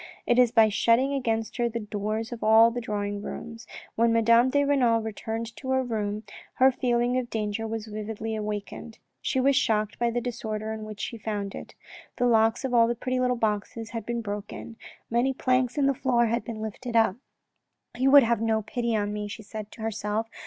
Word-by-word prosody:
It 240 +1 +3
is 245 -2 +5
by 225 -2 +6
shutting 230 +6 +2
against 225 -5 -1
her 240 -1 +1
the 230 0 -4
doors 215 +2 -3
of 240 - -6
all 225 +2 +6
the 245 +1 -4
drawing 205 -2 -3
rooms. 230 +1 -8 0.3
When 230 +1 +2
Madame 230 +2 +4
de 285 +2 +2
Renal 255 -5 +3
returned 225 +1 -5
to 260 - -7
her 260 0 +2
room, 215 -3 -3 0.3
her 260 +1 +5
feeling 245 0 +1
of 245 -2 -5
danger 220 0 -2
was 220 -1 -4
vividly 220 +1 -5
awakened. 210 +1 -5 0.2
She 260 - 0
was 275 +1 +3
shocked 215 -3 +1
by 235 0 +2
the 240 +1 -1
disorder 220 -2 -4
in 220 -1 -6
which 215 -1 -8
she 230 - -5
found 205 -2 -3
it. - - -9 0.4
The 245 - 0
locks 225 +1 +3
of 255 - -3
all 230 -1 +5
the 240 - -1
pretty 255 +2 -2
little 250 0 +2
boxes 220 0 -2
had 230 -3 -5
been 235 0 -2
broken. 210 +2 -6 0.4
Many 250 +3 +1
planks 255 0 +1
in 285 - +3
the 275 - +3
floor 245 -2 +2
had 235 +1 0
been 225 -2 -6
lifted 230 +3 -6
up. 225 -3 +3 0.4
" - - -55
He 260 - +3
would 280 0 +8
have 235 -1 +1
no 220 -1 +1
pity 235 +1 -2
on 205 -1 -1
me," 210 0 -3
she 210 +2 -8
said 215 0 -7
to - - -11
herself. 220 0 -2
225 Hz, 210 wpm, -26 LUFS, 215-240 Hz, 0.4 s, would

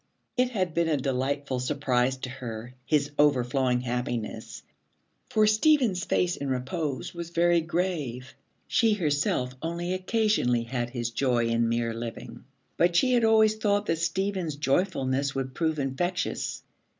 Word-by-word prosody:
It 250 0 +2
had 185 -8 -1
been 170 0 +1
a 155 -2 +2
delightful 135 0 -1
surprise 130 -1 0
to 130 - -6
her, 120 -2 -7
his 145 -1 +1
overflowing 130 -3 +2
happiness, 120 -2 -4 0.7
for 215 0 +3
Stephen's 215 - +3
face 175 -1 +1
in 140 - -4
repose 130 0 -3
was 170 -1 -6
very 170 0 +3
grave. 160 -8 -3 0.3
She 225 -2 +3
herself 145 -8 0
only 170 +2 -2
occasionally 185 - +1
had 120 0 -3
his 120 -2 -3
joy 120 -1 +1
in 115 0 +1
mere 115 0 0
living, 115 0 -7 0.3
but 175 0 +3
she 255 +8 +4
had 240 -1 +3
always 220 -1 +4
thought 205 -1 +1
that 165 -3 0
Stephen's 180 -1 -1
joyfulness 140 -3 0
would 130 -1 -3
prove 160 +1 0
infectious. 150 +7 -2
145 Hz, 140 wpm, -27 LUFS, 125-180 Hz, 0.7 s, she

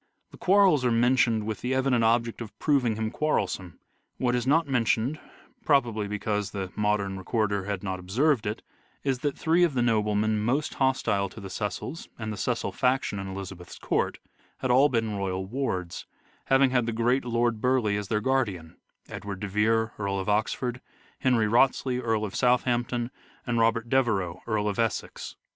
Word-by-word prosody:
The - - -13
quarrels 190 -7 +4
are 125 - +3
mentioned 115 -2 +3
with 110 -1 -4
the 130 +1 -1
evident 130 -3 +2
object 115 +1 +1
of 115 - -8
proving 130 -7 +2
him 110 0 -2
quarrelsome. 95 - -1 0.4
What 125 -1 +1
is 125 0 -1
not 160 +3 +3
mentioned, 125 +2 +1 0.4
probably 120 -8 +2
because 105 -1 -2
the 95 -2 -5
modern 105 -2 0
recorder 100 0 -1
had 100 -2 -3
not 95 -2 -3
observed 115 +6 +1
it, 105 - -4 0.4
is 135 -3 0
that 145 -1 -2
three 165 +2 +3
of 165 -6 +2
the 120 - +2
noblemen 105 -1 +1
most 130 +7 0
hostile 115 -7 +1
to 105 - -11
the 95 -2 -8
Cecils 105 - -4
and 110 -1 -4
the - - -7
Cecil - - -1
faction 125 -5 0
in 95 - -5
Elizabeth's 95 -2 -8
court, - - -1 0.4
had 130 - -1
all 135 +4 +5
been 115 -4 -1
royal 95 -1 -2
wards, 95 -7 -3 0.4
having 135 0 +4
had 125 -3 +1
the 115 - -1
great 120 +4 +1
Lord 120 -2 0
Burleigh 125 -5 +2
as 105 -1 -3
their 105 +1 0
guardian 105 -11 -1 0.2
— - - -36
Edward 100 -2 -6
de 105 - -2
Vere, 110 +2 +1
Earl 100 -1 -1
of 95 - -4
Oxford; 120 +4 -1 0.4
Henry 125 -4 +2
Wriothes 125 +6 +3
ley, 125 -1 -1
Earl 110 -3 0
of 100 - -6
Southampton; 120 -1 +1 0.3
and 120 -2 0
Robert 115 0 +2
Devereux, 100 -9 +1
Earl 105 -2 0
of 100 0 -2
Essex. 115 -2 -2
115 Hz, 180 wpm, -27 LUFS, 105-125 Hz, 0.4 s, all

